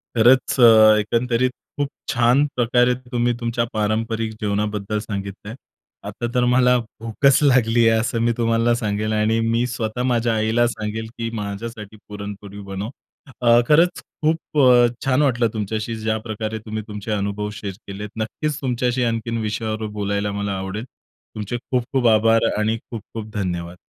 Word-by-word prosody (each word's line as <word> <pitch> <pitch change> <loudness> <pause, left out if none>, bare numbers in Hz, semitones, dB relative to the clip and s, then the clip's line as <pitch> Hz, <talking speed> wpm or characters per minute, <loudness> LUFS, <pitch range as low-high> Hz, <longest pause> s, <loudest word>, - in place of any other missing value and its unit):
खरंच 125 +3 +4 0.4
एकंदरीत 120 +3 +1 0.3
खूप 145 -1 0 0.2
छान 125 +4 +3
प्रकारे 125 0 +3 0.2
तुम्ही 120 0 +1
तुमच्या 120 0 -1
पारंपरिक 110 +1 -1
जीवनाबद्दल 105 0 -1
सांगितलंय. 100 0 -6 0.5
आता 120 - -4
तर 125 - +3
मला 125 0 +4
भूकच 115 +4 +1
लागली 120 -4 +4
आहे. 115 0 +4
असं 115 +1 -1
मी 120 0 +2
तुम्हाला 115 0 +2
सांगेल 110 -1 -2
आणि 110 +1 +2
मी 115 +1 +1
स्वतः 120 0 -3
माझ्या 120 -2 +1
आईला 110 +2 +2
सांगेल, 110 -1 -4
की 115 0 -3
माझ्यासाठी 105 +1 -7
पुरणपोळी 100 -1 -8
बनव. 100 +3 -4 0.5
अ, 120 -1 +6
खरंच 165 +4 +4 0.2
खूप 155 -1 0
अ, 125 -2 +6 0.2
छान 135 +1 +2
वाटलं 120 -5 +2
तुमच्याशी 110 +1 -3
ज्या 110 0 -1
प्रकारे 110 0 -3
तुम्ही 110 0 -4
तुमचे 105 +1 -6
अनुभव 105 0 -2
शेअर 100 -2 -5
केलेत 105 +2 -6
नक्कीच 140 +7 -3
तुमच्याशी 125 -1 0
आणखीन 115 0 -1
विषयावर 110 0 -3
बोलायला 100 0 -1
मला 100 -1 -3
आवडेल. 95 +3 -4 0.5
तुमचे 105 +3 -3
खूप-खूप 125 +1 -1
आभार 115 +1 +4
आणि 110 +1 +1
खूप-खूप 115 -1 -8
धन्यवाद! 90 -3 -3
115 Hz, 145 wpm, -21 LUFS, 105-120 Hz, 0.5 s, अ